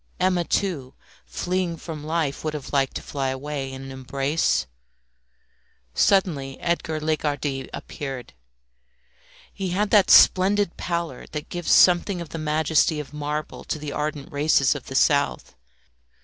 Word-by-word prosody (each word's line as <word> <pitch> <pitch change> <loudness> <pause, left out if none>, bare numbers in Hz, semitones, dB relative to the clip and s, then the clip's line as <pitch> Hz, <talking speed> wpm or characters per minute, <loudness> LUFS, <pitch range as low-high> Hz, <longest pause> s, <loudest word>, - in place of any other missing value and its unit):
Emma, 180 -1 +2
too, 160 -8 -2 0.3
fleeing 175 - -2
from 155 -2 -7
life, 155 -3 -2
would 155 -1 -2
have 145 -1 -7
liked 135 -2 +1
to - - -4
fly 135 -2 -3
away 135 0 -4
in 135 0 -8
an 135 - -8
embrace. 135 - 0 1.3
Suddenly 150 - +1
Edgar 170 -2 -1
Lagardy 145 -3 -2
appeared. 135 -4 -7 1.2
He 190 -2 -3
had 200 +3 0
that 205 -4 +5
splendid 195 0 +6
pallor 170 -6 -4
that 150 -1 -5
gives 175 -2 -2
something 180 +1 +5
of 170 -3 -7
the 165 - -6
majesty 155 0 +2
of 150 0 -8
marble 150 +1 -4
to - - -2
the 150 -1 -6
ardent 150 -1 -4
races 145 -1 +3
of 145 -4 -8
the 135 - -7
South. 140 - +2
150 Hz, 140 wpm, -24 LUFS, 140-170 Hz, 1.3 s, splendid